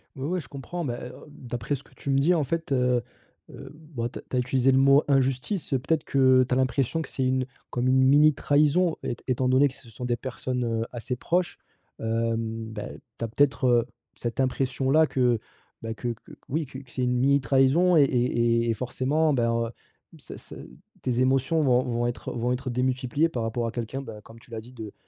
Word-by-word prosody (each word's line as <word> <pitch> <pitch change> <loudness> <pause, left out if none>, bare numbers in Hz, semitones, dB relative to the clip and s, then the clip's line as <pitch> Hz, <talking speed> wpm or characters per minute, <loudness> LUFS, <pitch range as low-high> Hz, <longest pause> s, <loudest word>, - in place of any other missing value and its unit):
Oui, 135 0 -4
oui, 180 +1 0
je 145 - -10
comprends, 155 +5 -6
bah, 120 -3 -3
heu, 125 - -11
d'après 125 -3 -4
ce 140 - -10
que - - -23
tu - - -7
me 135 - +3
dis 160 +6 +4
en 160 -5 +1
fait, 165 +2 -3
heu, 125 -2 +2 0.5
heu, 135 - -10
bon 150 -7 -5
tu - - -8
as - - -9
tu - - -7
as - - +3
utilisé 130 +1 +2
le 130 - +3
mot: 140 +2 +5
«injustice», 135 +7 0
peut-être 140 +4 0
que, 130 -1 +4
tu 130 - -1
as - - +3
l'impression 130 +4 0
que - - -7
c'est 130 - -2
une 130 0 +1 0.2
comme 125 +1 -1
une 130 0 +4
mini 145 +3 +6
trahison 150 +5 +2
é - - -2
étant 130 0 +1
donné 130 +3 +5
que 135 - -7
ce 125 - -12
sont 115 +3 -7
des 120 -1 +1
personnes, 125 +1 -4
heu, 115 -1 -1
assez 125 +1 -4
proches, 175 +6 -1 0.4
hem, 115 0 -2
bah, 105 -1 -6 0.3
tu 115 - -1
as - - -3
peut-être, 135 +3 +2
heu, 120 -2 +4 0.3
cette 120 0 -5
impression-là 135 +3 +2
que, 125 -5 +1 0.4
bah, 115 0 -4
que 120 +2 -4
que - - -16 0.2
oui, 155 +3 -1
que 130 -1 -9
c'est 125 +1 -4
une 125 0 +1
mini 140 +3 +3
trahison 140 +7 +4
et 150 - +7
et 120 -2 +1
et - - +3
forcément, 135 +7 0
bah, 120 -3 +1
heu, 115 0 0 0.5
ça, - - -10
ça - - -10 0.5
tes 125 -1 -1
émotions 135 +5 +2
vont 130 -3 +3
vont 120 -1 -1
être 120 - -4
vont 120 +1 -1
être 130 +1 -4
démultipliées 130 +4 0
par 120 -7 -3
rapport 115 +1 -2
à - - -3
quelqu'un, 120 +3 -4
bah, 110 -5 -9
comme 115 +1 -14
tu 115 - -20
l'as 110 -1 -5
dit, 120 +3 -14
de 110 -4 -8
130 Hz, 220 wpm, -26 LUFS, 120-140 Hz, 0.5 s, et